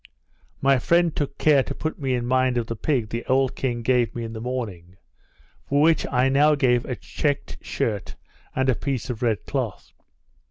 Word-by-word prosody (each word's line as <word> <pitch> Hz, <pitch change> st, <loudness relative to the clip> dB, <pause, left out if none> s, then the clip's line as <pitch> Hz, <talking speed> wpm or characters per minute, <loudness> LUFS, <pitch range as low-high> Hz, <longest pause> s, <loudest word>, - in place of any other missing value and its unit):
My 135 Hz, -1 st, +4 dB
friend 170 Hz, +4 st, +2 dB
took 140 Hz, -1 st, -3 dB
care 150 Hz, -3 st, +4 dB
to 140 Hz, -, -5 dB
put 155 Hz, -, -4 dB
me 135 Hz, -3 st, 0 dB
in 120 Hz, -1 st, -2 dB
mind 130 Hz, 0 st, +2 dB
of 120 Hz, -, 0 dB
the 115 Hz, -, -4 dB
pig 120 Hz, -3 st, -1 dB
the 115 Hz, +2 st, -3 dB
old 130 Hz, 0 st, +2 dB
king 120 Hz, -3 st, -2 dB
gave 125 Hz, -1 st, +2 dB
me 120 Hz, -, -3 dB
in 115 Hz, 0 st, -6 dB
the 110 Hz, -, -6 dB
morning; 105 Hz, -8 st, -5 dB, 0.7 s
for 140 Hz, -, +2 dB
which 160 Hz, +1 st, +3 dB
I 125 Hz, 0 st, +3 dB
now 145 Hz, +3 st, +4 dB
gave 125 Hz, -3 st, +2 dB
a 125 Hz, -, -3 dB
chequed 145 Hz, +2 st, -3 dB
shirt 105 Hz, -5 st, -3 dB, 0.4 s
and 130 Hz, 0 st, +1 dB
a 130 Hz, -, +4 dB
piece 130 Hz, 0 st, -3 dB
of 115 Hz, -, -7 dB
red 115 Hz, -6 st, 0 dB
cloth. -, -, -4 dB
130 Hz, 195 wpm, -24 LUFS, 120-140 Hz, 0.7 s, My